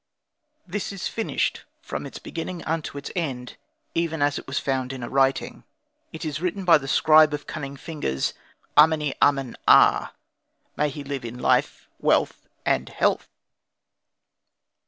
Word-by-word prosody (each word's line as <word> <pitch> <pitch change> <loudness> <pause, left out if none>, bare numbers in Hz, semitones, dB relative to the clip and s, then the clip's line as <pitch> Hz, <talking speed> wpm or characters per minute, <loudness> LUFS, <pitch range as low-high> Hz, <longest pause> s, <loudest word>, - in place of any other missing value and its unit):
This 195 +3 -4
is 195 -2 -4
finished 225 - -2 0.2
from - - -6
its - - -9
beginning 170 +1 -6
unto 155 -3 -3
its 140 - -6
end, 130 -8 -3 0.4
even 165 -1 -1
as 145 0 +1
it - - -13
was 135 - -3
found 130 -1 -1
in 130 -2 -7
a 120 - -5
writing. 135 0 +1 0.5
It 160 - -7
is 155 0 -3
written 185 +2 -2
by 165 -3 +7
the 135 - -8
scribe 155 +1 +5
of 145 - -9
cunning 140 -2 -6
fingers 140 - -3 0.4
Ameni 150 -2 +5
amen 135 -3 +2
aa; - - +6 0.7
may 150 - +1
he 145 +1 -7
live 140 -2 -5
in 120 +1 -7
life, 125 - +1
wealth, - - +1 0.2
and - - +1
health! - - 0
150 Hz, 150 wpm, -24 LUFS, 135-165 Hz, 0.7 s, by